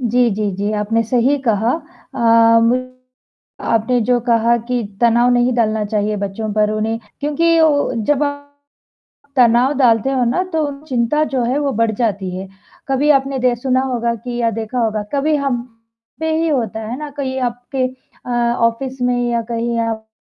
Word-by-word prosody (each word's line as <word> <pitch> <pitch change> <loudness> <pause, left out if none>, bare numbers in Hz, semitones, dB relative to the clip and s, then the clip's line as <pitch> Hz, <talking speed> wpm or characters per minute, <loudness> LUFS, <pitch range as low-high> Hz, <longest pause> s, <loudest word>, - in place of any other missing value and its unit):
जी, 245 0 +2
जी, 210 0 -1
जी 205 +2 -1
आपने 215 +2 0
सही 250 +5 +2
कहा। 220 +2 +2 0.4
अ, - - -6 0.4
म 255 +2 +1 0.8
आपने 230 +2 +2
जो 245 +2 +2
कहा 235 0 +3
कि 250 -1 0 0.2
तनाव 240 +1 +4
नहीं 245 +1 +2
डलना 220 -2 +1
चाहिए 210 0 -1
बच्चों 205 +2 -4
पर 210 0 +2
उन्हें 220 +1 -1 0.2
क्योंकि 330 +3 +2
उ 290 -4 +2
जब 295 +4 +1
आप 285 0 -4 0.9
तनाव 245 +2 +4
डालते 240 -1 +3
हो 260 -2 +1
ना 245 +10 +1
तो 320 -1 +1 0.2
चिंता 255 +3 +1
जो 255 - +1
है 250 +4 0
वो 285 -2 0
बढ़ 230 -1 +3
जाती 200 -5 -1
है। 190 +1 -6 0.4
कभी 270 +2 +2
आपने 270 0 -4
दे 250 -1 +2
सुना 255 +2 0
होगा 235 -1 0
कि 240 +1 -6
या 230 -1 +2
देखा 225 +3 -4
होगा, 220 -2 0
कभी 295 +2 +1
हम 275 -4 -1 0.6
पे 320 0 0
ही 325 +1 +1
होता 230 -7 -1
है 240 - -4
ना, 300 -1 -6
कहीं 265 -2 -4
आपके 245 +2 -2 0.4
अ, - - -5 0.3
ऑफ़िस 255 +3 -1
में 245 -1 +1
या 235 -1 +1
कहीं 235 0 -2
आप 225 -1 -3
240 Hz, 175 wpm, -18 LUFS, 225-265 Hz, 0.9 s, तनाव